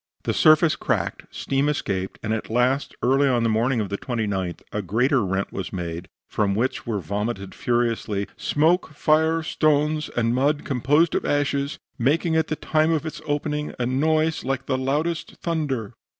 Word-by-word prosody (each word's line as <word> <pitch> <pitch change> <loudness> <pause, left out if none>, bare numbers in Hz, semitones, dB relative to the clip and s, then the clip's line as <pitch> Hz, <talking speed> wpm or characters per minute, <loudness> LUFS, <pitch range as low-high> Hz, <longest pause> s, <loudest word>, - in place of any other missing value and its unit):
The - - 0
surface 155 +1 +5
cracked, - - -2
steam 135 +2 0
escaped, 95 -10 -2
and 110 0 -1
at 110 - -3
last, 125 +4 +1
early 135 +3 +4
on 120 -3 +2
the 115 - +2
morning 115 +3 +1
of 105 -3 -2
the 100 - -3
29th, 100 -8 -3
a 105 - -1
greater 120 - +2
rent 95 +1 -2
was 95 - -4
made, 85 -1 -5 0.2
from 100 -2 0
which 120 +3 -1
were 110 -3 -1
vomited 100 +2 -3
furiously 115 -4 0
"smoke, 160 +1 +1
fire, 160 +2 +2
stones 155 0 +1
and 115 0 +2
mud 145 +4 +1
composed 145 +5 +2
of - - 0
ashes, 140 0 0 0.2
making 160 +6 +2
at 160 -1 +2
the 155 - -1
time 155 +1 +1
of 160 -1 0
its 160 - -6
opening 150 0 -2
a 125 - -1
noise 155 +5 +1
like 135 0 -2
the - - 0
loudest 150 +6 -1
thunder." 145 - -2
135 Hz, 170 wpm, -24 LUFS, 110-150 Hz, 0.2 s, surface